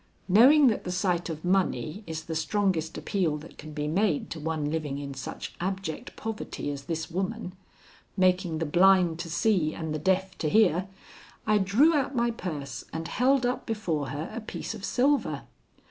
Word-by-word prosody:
Knowing 260 Hz, +10 st, +7 dB
that 230 Hz, -5 st, +3 dB
the 180 Hz, -, -4 dB
sight 180 Hz, -1 st, 0 dB
of 160 Hz, +1 st, -5 dB
money 185 Hz, 0 st, 0 dB
is 160 Hz, 0 st, -4 dB
the 165 Hz, -, -5 dB
strongest 165 Hz, -1 st, 0 dB
appeal 180 Hz, -7 st, 0 dB
that 150 Hz, +2 st, -13 dB
can 155 Hz, +1 st, -8 dB
be 150 Hz, 0 st, -3 dB
made 170 Hz, 0 st, +1 dB
to 165 Hz, -, -4 dB
one 155 Hz, -1 st, -2 dB
living 150 Hz, -3 st, -2 dB
in 140 Hz, -1 st, -5 dB
such 135 Hz, -1 st, -6 dB
abject 190 Hz, -3 st, -4 dB
poverty 220 Hz, -9 st, -4 dB
as 140 Hz, -1 st, -7 dB
this 165 Hz, 0 st, -3 dB
woman, 190 Hz, +2 st, -3 dB, 0.6 s
making 180 Hz, -3 st, +2 dB
the 165 Hz, -, -1 dB
blind 175 Hz, +1 st, +4 dB
to 170 Hz, -1 st, -5 dB
see 170 Hz, -2 st, +1 dB
and 160 Hz, -2 st, -4 dB
the 155 Hz, -, -2 dB
deaf 190 Hz, +3 st, +1 dB
to 155 Hz, -, 0 dB
hear, 190 Hz, -2 st, +3 dB, 0.6 s
I 215 Hz, -1 st, +3 dB
drew 220 Hz, -, +4 dB
out 275 Hz, -1 st, 0 dB
my 235 Hz, 0 st, +2 dB
purse 155 Hz, -10 st, -5 dB
and 165 Hz, +1 st, -4 dB
held 260 Hz, +4 st, +2 dB
up 245 Hz, +1 st, -2 dB
before 175 Hz, -, -1 dB
her 145 Hz, +4 st, -5 dB
a 230 Hz, -, -4 dB
piece 220 Hz, -, -5 dB
of 215 Hz, -3 st, -9 dB
silver. 275 Hz, +6 st, +1 dB
180 Hz, 180 wpm, -28 LUFS, 160-210 Hz, 0.6 s, Knowing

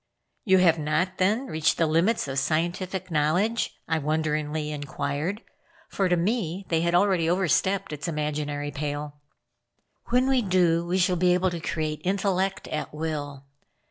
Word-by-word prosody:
"You 190 Hz, -3 st, +5 dB
have 170 Hz, -3 st, +4 dB
not, 155 Hz, +5 st, -1 dB
then, 210 Hz, +8 st, +2 dB
reached 160 Hz, -, +1 dB
the 165 Hz, -, +3 dB
limits 165 Hz, +6 st, +2 dB
of 135 Hz, 0 st, -1 dB
scientific 175 Hz, +5 st, -2 dB
knowledge?" 175 Hz, +10 st, +1 dB
I 160 Hz, -1 st, +1 dB
wonderingly 155 Hz, 0 st, -1 dB
inquired, 145 Hz, -, -3 dB, 0.5 s
for, 195 Hz, -2 st, 0 dB
to 175 Hz, -, +3 dB
me, 190 Hz, -1 st, -1 dB
they 165 Hz, -1 st, +2 dB
had 170 Hz, +1 st, +1 dB
already 180 Hz, -3 st, +3 dB
overstepped 190 Hz, 0 st, +1 dB
its 145 Hz, -1 st, -5 dB
imaginary 150 Hz, -2 st, -2 dB
pale. 145 Hz, 0 st, -5 dB, 0.9 s
"When 250 Hz, +2 st, +2 dB
we 265 Hz, -2 st, +3 dB
do 175 Hz, -4 st, +2 dB
we 180 Hz, +2 st, +1 dB
shall 180 Hz, -1 st, +2 dB
be 180 Hz, +1 st, +4 dB
able 185 Hz, 0 st, +1 dB
to 170 Hz, -, -4 dB
create 155 Hz, -1 st, -3 dB
intellect 195 Hz, 0 st, 0 dB
at 155 Hz, -, -3 dB
will. 145 Hz, -3 st, -4 dB
165 Hz, 150 wpm, -26 LUFS, 150-185 Hz, 0.9 s, You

